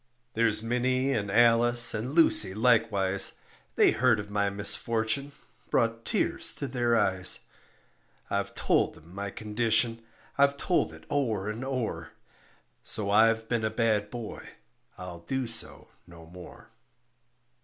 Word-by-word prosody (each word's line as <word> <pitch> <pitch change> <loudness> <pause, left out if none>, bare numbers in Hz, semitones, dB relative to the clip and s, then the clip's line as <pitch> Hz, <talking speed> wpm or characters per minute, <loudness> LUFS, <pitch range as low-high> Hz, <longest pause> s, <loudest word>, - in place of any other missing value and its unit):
There's 110 -1 +1
Minnie 130 +3 0
and 100 -4 -2
Alice 120 +2 +5
and 120 +6 -4
Lucy 105 - +5
likewise, 105 -4 +2 0.4
They - - +4
heard 115 -3 +2
of 105 0 -8
my 100 -1 0
misfortune 110 +6 -1 0.4
brought 115 0 -1
tears - - -1
to - - -5
their 120 -2 0
eyes. 95 -3 +1 0.9
I've - - -3
told - - 0
'em 80 +3 -18
my 100 +1 -5
condition, 115 +2 -1 0.4
I've 140 0 +3
told 170 - 0
it 80 0 -15
o'er 110 -8 -1
and 115 +4 -7
o'er; 130 -4 -4 0.7
So 100 -2 -3
I've 115 +1 +3
been 115 -2 -2
a 110 - 0
bad 110 -2 0
boy, 120 -2 -8 0.5
I'll 90 -2 -9
do 130 +9 -4
so 115 -1 -4 0.2
no 85 -2 -14
more. 90 +2 -14
115 Hz, 135 wpm, -27 LUFS, 100-120 Hz, 0.9 s, Alice